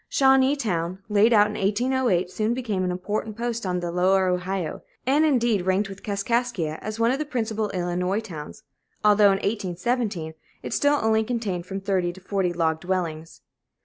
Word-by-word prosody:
Shawneetown, 260 - +2
laid 210 +2 +4
out 210 -2 +6
in 210 - -4
1808, 210 -2 +1
soon 220 +4 0
became 215 -7 -2
an 180 - 0
important 205 +4 -3
post 235 -3 -3
on 180 -1 -1
the 175 -1 -3
Lower 185 +2 +3
Ohio, 180 -2 -2 0.2
and 280 +4 +3
indeed 240 - +2
ranked 195 +2 +1
with 195 0 -9
Kaskaskia 200 -5 -1
as 215 +1 -5
one 230 +1 +3
of 270 - -1
the - - 0
principal 220 -6 -2
Illinois 180 +2 -1
towns, 160 - -9 0.4
although 210 0 +6
in 195 - +5
1817 200 -3 -2 0.3
it - - -4
still 290 0 +3
only 220 0 +3
contained 215 -7 -3
from 195 +1 -5
thirty 190 -3 0
to 190 - -13
forty 190 -1 -1
log 160 -2 0
dwellings. 165 -3 -3
200 Hz, 170 wpm, -24 LUFS, 180-230 Hz, 0.4 s, out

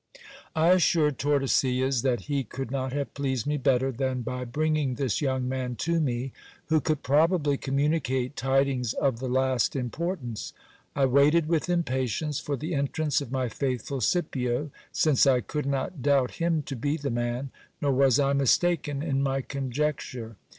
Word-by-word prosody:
I 160 +2 +3
assured 165 -5 +3
Tordesillas 135 -2 +1
that 125 -2 0
he 140 -2 -1
could 130 +2 -6
not 130 -1 -2
have 140 +1 -3
pleased 130 -4 -2
me 150 0 0
better 135 -1 +2
than 130 0 -2
by 125 +1 -4
bringing 150 0 0
this 130 -6 -1
young 130 -3 0
man 130 -1 -3
to 170 +7 0
me, 130 -3 -1 0.4
who 155 -1 +3
could 155 -1 -1
probably 150 +1 +3
communicate 135 -1 0
tidings 135 -2 +1
of 135 -5 0
the 130 - -3
last 130 -1 +1
importance. 130 - -4 0.4
I 140 - +3
waited 145 +5 +4
with 165 +1 0
impatience 145 -3 -1
for 145 -1 -3
the 155 +6 -4
entrance 145 +1 0
of 130 -4 -7
my 130 -2 0
faithful 130 +2 -3
Scipio; 135 - 0 0.2
since 145 -3 +3
I 130 -2 +5
could 145 +5 -4
not 140 +3 -2
doubt 135 -2 +2
him 165 -3 +1
to 135 - -5
be 145 +6 -1
the 140 -3 -3
man, 120 +3 -2 0.3
nor 145 - +1
was 135 -2 +4
1 140 0 +2
mistaken 145 0 +1
in 135 -4 0
my 135 0 0
conjecture. 130 -4 -3
135 Hz, 165 wpm, -27 LUFS, 130-150 Hz, 0.4 s, I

